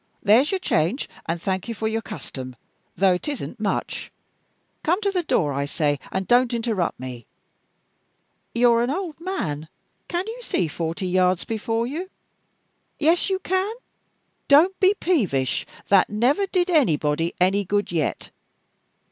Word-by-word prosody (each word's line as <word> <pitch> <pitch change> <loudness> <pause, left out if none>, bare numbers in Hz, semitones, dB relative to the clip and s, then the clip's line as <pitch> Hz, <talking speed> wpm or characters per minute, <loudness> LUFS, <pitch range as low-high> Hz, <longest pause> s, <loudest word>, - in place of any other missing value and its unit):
There's 230 +8 +5
your 385 - +1
change, 220 - 0 0.2
and 165 +1 -1
thank 190 +2 -2
you 230 - -4
for 220 - -2
your 225 +1 -1
custom, 130 - -8 0.4
though 190 -1 +4
it 180 - -4
isn't 285 -4 -5
much. 205 -2 -2 0.7
Come 350 +5 +1
to 400 -1 +1
the 365 -2 0
door, 155 - +1
I 140 +1 -1
say, 145 -1 0
and 190 0 -2
don't 245 0 +4
interrupt 225 -7 -1
me! 125 -3 -8 1.3
You're 235 -1 +5
an 240 - 0
old 330 +1 -3
man 160 - -3 0.4
can 350 +1 -2
you 455 +3 -6
see 185 - 0
forty 165 +5 -3
yards 180 0 +2
before 225 +1 -1
you? 325 +9 -4 0.9
Yes, 330 +5 +2
you 380 - +1
can! 380 +3 -1 0.7
Don't 330 +7 +5
be 385 +2 +5
peevish 200 - 0 0.2
that 195 -2 +5
never 255 - +2
did 365 -1 +1
anybody 165 - +2
any 190 +3 +3
good 205 +1 -1
yet. 160 -3 -2
225 Hz, 145 wpm, -23 LUFS, -, 1.3 s, There's